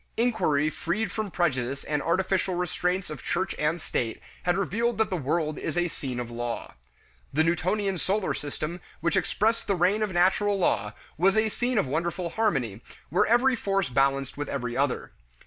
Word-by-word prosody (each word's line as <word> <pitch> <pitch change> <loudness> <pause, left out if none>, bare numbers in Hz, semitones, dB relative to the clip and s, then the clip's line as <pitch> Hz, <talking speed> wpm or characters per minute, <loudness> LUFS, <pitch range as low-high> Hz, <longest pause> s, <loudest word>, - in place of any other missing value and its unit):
Inquiry 155 -11 +2
freed 185 +6 -2
from 215 0 -2
prejudice 140 -7 0
and 150 -1 -1
artificial 185 +2 +1
restraints 180 0 -1
of 150 - -6
church 190 - -1
and 155 +3 +1
state 120 -7 -2 0.2
had 175 +1 +1
revealed 225 +4 0
that 220 -2 +1
the - - +1
world 155 0 -1
is - - -3
a 175 0 +2
scene 130 -5 -4
of 120 -1 -4
law. 120 0 -4 0.6
The 155 +3 +3
Newtonian 185 +3 +1
solar 195 +3 0
system, 155 +4 -5 0.2
which 170 -1 +1
expressed 225 +2 +1
the 200 - +2
reign 185 +5 +2
of 210 -2 0
natural 190 +3 +3
law, 105 - +1 0.3
was 195 +4 +4
a 220 0 +3
scene 245 +3 -1
of 200 - +3
wonderful 170 +5 -2
harmony, 135 - 0 0.3
where 175 - +3
every 245 +3 +4
force 195 - 0
balanced 135 +1 +1
with 145 - -3
every 125 -3 -3
other. 140 -1 0
175 Hz, 175 wpm, -27 LUFS, 145-200 Hz, 0.6 s, was